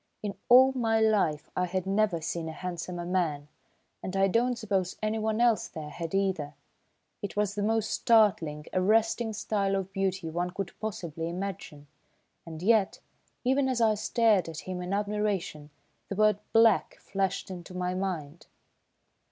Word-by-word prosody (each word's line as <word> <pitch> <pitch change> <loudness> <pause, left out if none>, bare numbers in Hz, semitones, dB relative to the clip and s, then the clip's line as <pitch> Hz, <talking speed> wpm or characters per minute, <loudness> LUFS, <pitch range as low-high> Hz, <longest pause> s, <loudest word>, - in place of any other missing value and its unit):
In 205 -1 -2 0.2
all 260 +2 +8
my 225 -4 +1
life 205 -9 +1
I 180 0 0
had 185 +1 -2
never 195 -3 +1
seen 165 0 -3
a - - -6
handsomer 175 +1 -5
man, 160 -5 -1 0.5
and 190 +1 -4
I 195 0 +4
don't 240 +5 +1
suppose 195 -5 -1
anyone 215 0 0
else 235 -2 +3
there 150 -2 -8
had 165 +3 -5
either. 185 -7 -1 0.7
It 205 - -5
was 205 -1 +1
the 205 - -3
most 220 +1 0
startling, 180 -10 +3
arresting 225 +4 +2
style 200 -2 -1
of 195 0 -3
beauty 190 -2 -1
one 175 +2 -2
could 185 0 -5
possibly 170 -6 -4
imagine, 175 -5 -6 0.6
and 160 0 -8
yet, 215 -1 +3 0.4
even 265 +1 +2
as 255 -2 0
I 225 -2 +4
stared 215 -4 +2
at 160 -1 -6
him 185 -1 -5
in 180 +1 -5
admiration, 200 -7 -2 0.4
the 200 - -3
word 215 0 +3
"Black!" 225 -3 +4
flashed 195 -1 -2
into 180 0 -8
my 180 0 -1
mind. 175 -5 -4
195 Hz, 155 wpm, -28 LUFS, 175-215 Hz, 0.7 s, all